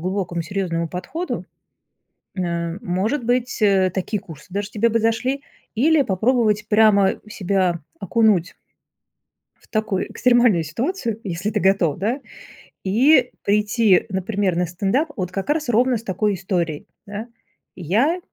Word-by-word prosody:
глубокому 180 -1 -2
серьёзному 170 -2 -2
подходу, 250 - -4 0.9
н 185 -1 -1
э, 170 +1 -3
может 220 +7 -1
быть, 245 -1 0
э, 190 -3 +4
такие 195 +2 -2
курсы 160 -5 -12
даже 205 +1 -2
тебе 225 +2 +2
бы 230 +1 +1
зашли, 250 +5 0 0.3
или 295 +6 +4
попробовать 215 0 +1
прямо 210 -2 +4
себя 185 -4 0 0.2
окунуть 200 -3 +2 1.0
в - - -26
такую 215 -4 -1
экстремальную 240 -9 +3
ситуацию, 230 - -3
если 185 +2 -3
ты 210 -1 -1
готов, 190 -6 +2
да, 230 +9 -1 0.6
и 250 +6 +4
прийти, 210 -1 +3
например, 190 -1 -1
на 180 - +2
стендап 200 - -1
вот 185 -2 -3
как 195 +8 -4
раз 300 -3 0
ровно 245 +1 +3
с 220 - -11
такой 205 0 0
историей, 175 -5 -2 0.2
да. 210 +3 -6 0.5
"Я 225 - +1
205 Hz, 135 wpm, -21 LUFS, 185-235 Hz, 1.0 s, э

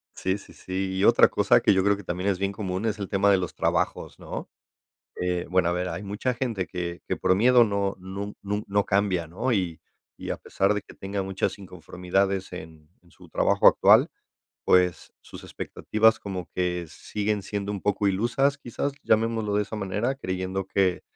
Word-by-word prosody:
Sí, 95 +2 -1
sí, - - -15
sí, 95 +1 -4
y 95 - 0
otra - - +7
cosa - - +3
que - - +4
yo 95 0 +2
creo 100 0 +3
que 100 - -10
también 90 +3 -2
es 95 - 0
bien 100 +1 -1
común 95 0 -3
es 105 -1 -1
el 100 - -4
tema 100 +1 +3
de 95 - +5
los 90 -2 -3
trabajos, - - -1
¿no?, - - -7 0.7
eh, 90 -1 -1
bueno, 90 -1 +2
a - - +1
ver, 90 +1 -2
hay 85 +4 -5
mucha 105 +6 -2
gente 115 -7 -2
que 85 -1 -5
que - - -1
por 95 0 +2
miedo 120 +3 +6
no 100 -2 -1
nun 100 +2 -6
nun 105 +1 -3
no 100 0 +1
cambia, 95 -4 +1
¿no?, 120 +9 -1
y 90 -6 -1 0.4
y - - -7
a - - -1
pesar 100 +2 0
de 105 - -3
que - - -15
tenga 100 0 -4
muchas 95 +1 -2
inconformidades 95 +2 -2
en 80 -3 -10
en 85 - -24
su - - -17
trabajo - - +4
actual, - - +5 0.6
pues 90 -3 +2
sus - - -12
expectativas 110 +1 +1
como 95 -5 -5
que 90 -1 -1
siguen 105 +5 -3
siendo 100 +1 -4
un 100 - -5
poco 105 0 +1
ilusas, 120 +8 +1
quizás, 140 +2 -3
llamémoslo 110 -2 +1
de 105 - +2
esa 105 - -7
manera, 105 +6 -1
creyendo 95 -4 -3
que, 95 -2 +1
100 Hz, 195 wpm, -26 LUFS, 90-105 Hz, 0.7 s, otra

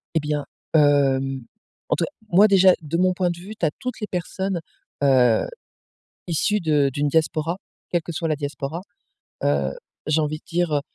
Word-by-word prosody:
Eh - - +4
bien, 150 -1 -2 0.3
hem, 135 -3 +3 0.5
en - - +3
tous - - -1
cas - - -10 0.2
moi 200 +5 +7
déjà, 190 -2 +6
de 160 +2 -2
mon 185 0 +3
point 180 -1 0
de 170 - -3
vue, 200 +5 -8
tu 170 - +1
as 150 - +2
toutes 255 -2 -4
les 210 - -2
personnes, 185 +1 -2 0.4
heu, 125 -5 +4 0.8
issues 200 +5 +1
de 150 -4 +2
d'une 145 +1 0
diaspora, 160 +3 0 0.3
quelle 175 -2 +1
que 170 - -6
soit 165 +1 -2
la 155 - +1
diaspora. 145 +3 -4 0.6
Heu, 70 -1 +1 0.3
j'ai 155 +1 +2
envie 155 0 -1
de - - -32
dire, 175 -2 0
heu - - +1
155 Hz, 185 wpm, -23 LUFS, 145-180 Hz, 0.8 s, moi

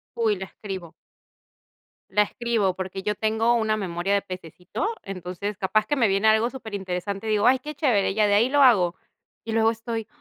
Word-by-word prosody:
Uy, 220 -3 +1
la 190 - -5
escribo 185 -6 -8 1.2
la 210 +2 +4
escribo, 220 -4 0
porque, 190 0 -5
yo 210 +1 -1
tengo 220 +2 +1
una 220 -2 +1
memoria 185 0 -1
de 200 - +2
pececito. 185 - -5
Entonces, 190 +2 -5
capaz 215 +3 +1
que 290 - +1
me 230 -5 +3
viene 195 +3 +1
algo 220 +2 +4
superinteresante, 200 -4 -5
y - - -1
digo: 210 +2 +2
"Ay, 260 +1 +5
qué 300 +4 -7
chévere, 230 -10 +1
ya 215 -1 +3
de 205 - +1
ahí 230 +5 +4
lo 285 +1 +3
hago". 185 -9 +5 0.5
Y 225 - -4
luego 225 0 +3
estoy: 225 -1 -4
210 Hz, 190 wpm, -25 LUFS, 190-230 Hz, 1.2 s, Ay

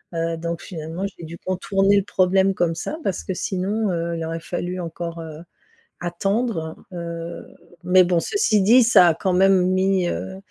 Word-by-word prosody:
heu, 165 0 -1
donc 170 0 -4
finalement, 165 +2 -6
j'ai 175 -4 -11
dû 170 +2 -9
contourner 195 +2 +1
le 200 - +2
problème 190 0 +2
comme 165 -2 0
ça 300 - -4
parce 190 - -2
que 190 - -3
sinon, 195 +4 -1
heu, 170 0 -2
il 165 - -4
aurait 165 0 -4
fallu 180 +1 -4
encore, 170 0 -6
heu, 155 -1 -8 0.7
attendre, 190 -1 -1 0.2
heu, 170 -1 -6 0.4
mais 185 0 +6
bon, 175 -1 +2
ceci 310 - +1
dit, 235 +5 +6
ça 205 -6 +6
a - - +3
quand 190 +2 -1
même 185 -1 +4
mis, 185 -1 +2
heu 190 - -4
180 Hz, 175 wpm, -22 LUFS, 170-195 Hz, 0.7 s, mais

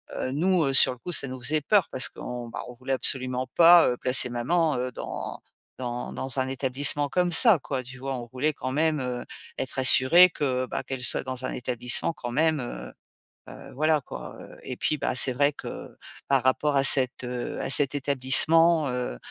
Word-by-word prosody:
heu, 130 - -4
nous, 175 +3 0
heu, 135 - -1
sur 130 - +4
le 125 - -17
coup, 180 - -8
ça 140 - +2
nous 130 -1 -9
faisait 155 +5 0
peur 200 +5 +1
parce 130 - -1
qu'on 120 -1 -8 0.3
voulait 130 +1 -4
absolument 130 -1 -2
pas, 170 -2 +6
heu, 125 - -3
placer 125 0 +2
maman, 150 +6 -1
heu, 125 0 -4
dans - - -7 0.4
dans 125 -1 -6
dans 135 0 +2
un 130 - -1
établissement 140 +2 -1
comme 175 +4 -1
ça 220 +3 +6
quoi, 135 -1 -5
tu 130 +1 -12
vois? 135 0 -5
On 120 - -9
voulait 145 +4 -2
quand 130 - -6
même, 155 +1 0
heu, 125 -1 -5 0.3
être 130 0 -5
assuré 130 +7 +7
que 130 -6 -3
bah - - -5
qu'elle 130 -1 -7
soit - - +3
dans 130 -1 -5
un - - -4
établissement 125 +5 -1
quand 120 -6 -8
même, 155 +2 0
heu 65 - -8 0.6
heu, - - -13
voilà 155 +2 +1
quoi, - - -10
heu, - - -14
et 125 - -7
puis 155 - -2
bah - - -3
c'est 130 0 +2
vrai 140 +3 +1
que - - -9 0.4
par 135 -2 +1
rapport 140 +3 0
à 135 - +2
cet, 130 -2 +3
heu, 125 0 -6
à - - -4
cet 140 -1 +4
établissement, 145 +4 +3
heu 125 - -4
130 Hz, 200 wpm, -25 LUFS, 125-150 Hz, 0.6 s, assuré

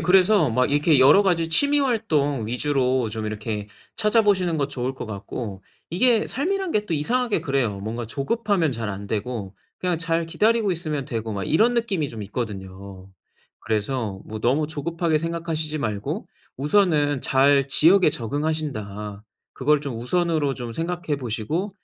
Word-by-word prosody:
그래서 180 - +4
막 125 +4 +1
이렇게 145 0 +4
여러 145 +10 +7
가지 170 -4 +1
취미 285 - +4
활동 155 - 0
위주로 130 -1 +1
좀 110 0 -4
이렇게 105 -1 -4 0.3
찾아보시는 205 -6 +2
거 145 -2 0
좋을 130 -2 -3
것 130 - -7
같고 100 -1 -6 0.3
이게 225 +6 +3
삶이란 375 +5 -1
게 210 0 0
또 165 - -1
이상하게 235 +9 0
그래요. 130 -8 0
뭔가 115 +3 -4
조급하면 170 - 0
잘 115 -2 -4
안되고 100 +1 -4 0.2
그냥 180 -3 -1
잘 165 0 0
기다리고 215 +3 +2
있으면 155 -4 -3
되고 115 -5 -4
막 100 -1 -3
이런 225 - +3
느낌이 195 -11 0
좀 110 -2 -7
있거든요. 95 -3 -7 0.5
그래서 110 -2 -2
뭐 110 0 -7
너무 135 +7 +2
조급하게 160 +1 -1
생각하시지 165 -1 -3
말고, 105 -7 -3 0.3
우선은 145 -3 +2
'잘 140 +1 +4
지역에 170 +6 +5
적응하신다.' 115 -7 -3 0.3
그걸 145 +2 +2
좀 135 -5 -4
우선으로 155 +2 0
좀 120 -3 -6
생각해 165 0 -2
보시고 130 - -3
145 Hz, 340 characters per minute, -23 LUFS, 115-175 Hz, 0.5 s, 여러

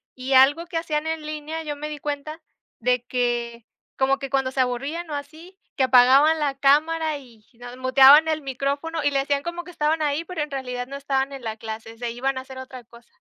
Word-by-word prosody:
Y 260 +1 -3
algo 280 +6 +5
que 345 -1 -5
hacían 315 -2 -2
en 320 -1 -3
línea, 305 +1 -5
yo 295 -2 -4
me 300 +1 -6
di 300 -1 -7
cuenta 295 +3 -5 0.4
de 250 -1 +1
que 240 -2 -2 0.3
como 270 +1 +2
que 275 -1 -5
cuando 270 -1 0
se 260 0 0
aburrían 280 +7 -3
o - - -2
así, 320 +7 -10 0.2
que 265 - +1
apagaban 265 +5 +5
la 280 -2 -1
cámara 310 +2 +2
y 235 -6 -17
no 245 +1 -10
muteaban 270 +4 +7
el 310 0 -1
micrófono, 280 +4 -3
y 290 - +2
le 275 - +1
hacían 280 +1 -1
como 345 0 -5
que 360 - -12
estaban 310 0 0
ahí, 300 +2 0
pero 360 -2 -5
en 295 - -3
realidad 250 -2 -4
no 275 - -8
estaban 275 0 -1
en 265 -3 -9
la 220 0 -4
clase, 225 +1 -8
se 240 0 -4
iban 260 +3 -2
a - - -3
hacer 260 0 -12
otra 255 -1 -9
cosa. 235 +1 -19
275 Hz, 220 wpm, -23 LUFS, 255-305 Hz, 0.4 s, muteaban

